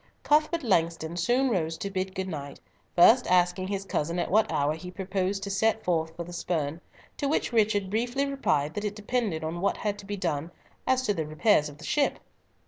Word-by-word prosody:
Cuthbert 310 Hz, +2 st, +2 dB
Langston 165 Hz, -5 st, +1 dB
soon 245 Hz, +9 st, +2 dB
rose 165 Hz, -5 st, -1 dB
to 200 Hz, -, -4 dB
bid 190 Hz, 0 st, -3 dB
good 190 Hz, 0 st, -2 dB
night, 145 Hz, -5 st, -6 dB, 0.4 s
first 225 Hz, +8 st, +6 dB
asking 180 Hz, +1 st, +2 dB
his 195 Hz, 0 st, -3 dB
cousin 170 Hz, -1 st, -1 dB
at 175 Hz, -, -1 dB
what 215 Hz, +2 st, +3 dB
hour 145 Hz, +1 st, +1 dB
he 170 Hz, +3 st, -8 dB
proposed 190 Hz, +1 st, -2 dB
to 200 Hz, -, -3 dB
set 220 Hz, +2 st, +1 dB
forth 160 Hz, -2 st, 0 dB
for 170 Hz, -, -4 dB
the 175 Hz, +1 st, -10 dB
Spurn, 160 Hz, -2 st, -2 dB, 0.4 s
to 285 Hz, -, -1 dB
which 280 Hz, -3 st, 0 dB
Richard 205 Hz, -3 st, +2 dB
briefly 245 Hz, +5 st, 0 dB
replied 155 Hz, -, 0 dB
that 205 Hz, -, -4 dB
it 210 Hz, -1 st, -2 dB
depended 210 Hz, -6 st, -2 dB
on 165 Hz, +2 st, -3 dB
what 200 Hz, -, +1 dB
had 205 Hz, -1 st, -2 dB
to 200 Hz, -, -11 dB
be 205 Hz, 0 st, -3 dB
done 165 Hz, -4 st, -2 dB, 0.4 s
as 260 Hz, 0 st, +3 dB
to 210 Hz, -, +1 dB
the 160 Hz, -5 st, -3 dB
repairs 155 Hz, 0 st, +3 dB
of 145 Hz, -, -13 dB
the 160 Hz, -, -10 dB
ship. 290 Hz, -, +1 dB
190 Hz, 210 wpm, -27 LUFS, 165-215 Hz, 0.4 s, first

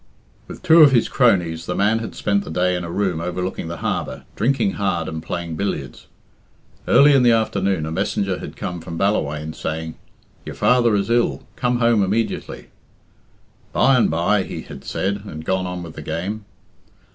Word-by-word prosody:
With -, -, -10 dB
two 165 Hz, -2 st, +7 dB
of 145 Hz, -3 st, +8 dB
his 120 Hz, -, +3 dB
cronies 90 Hz, -10 st, +2 dB
the -, -, -2 dB
man 105 Hz, +3 st, +2 dB
had 115 Hz, -, -6 dB
spent 100 Hz, -1 st, 0 dB
the -, -, -9 dB
day 90 Hz, +3 st, +1 dB
in 90 Hz, -, -3 dB
a 85 Hz, -, -6 dB
room 90 Hz, -2 st, -1 dB
overlooking 90 Hz, 0 st, -3 dB
the 85 Hz, +1 st, -5 dB
harbour, -, -, -3 dB
drinking 120 Hz, -3 st, +1 dB
hard 95 Hz, -5 st, -1 dB
and 80 Hz, 0 st, -5 dB
playing 85 Hz, -1 st, -5 dB
billiards. 75 Hz, -10 st, -4 dB, 0.8 s
Early 145 Hz, +1 st, +6 dB
in 135 Hz, -, +5 dB
the 120 Hz, -1 st, +5 dB
afternoon 100 Hz, -6 st, 0 dB
a 80 Hz, -, -5 dB
messenger 95 Hz, +1 st, -1 dB
had -, -, -8 dB
come 90 Hz, -1 st, -5 dB
from 85 Hz, 0 st, -7 dB
Ballawhaine, 75 Hz, -6 st, -1 dB
saying, 80 Hz, 0 st, -4 dB, 0.5 s
"Your -, -, -8 dB
father 120 Hz, -3 st, +3 dB
is 100 Hz, +2 st, -1 dB
ill 120 Hz, 0 st, +1 dB
come 125 Hz, -1 st, 0 dB
home 115 Hz, -3 st, +3 dB
immediately." 110 Hz, +4 st, -2 dB, 1.0 s
"By 135 Hz, -, +4 dB
and 125 Hz, -, +3 dB
bye," 85 Hz, +6 st, +2 dB
he 90 Hz, -, -6 dB
had -, -, -11 dB
said, 100 Hz, +1 st, -2 dB
and 80 Hz, -5 st, -8 dB
gone 95 Hz, 0 st, 0 dB
on 90 Hz, -1 st, -5 dB
with 80 Hz, -2 st, -9 dB
the -, -, -8 dB
game. 90 Hz, +8 st, -4 dB
95 Hz, 180 wpm, -21 LUFS, 85-115 Hz, 1.0 s, of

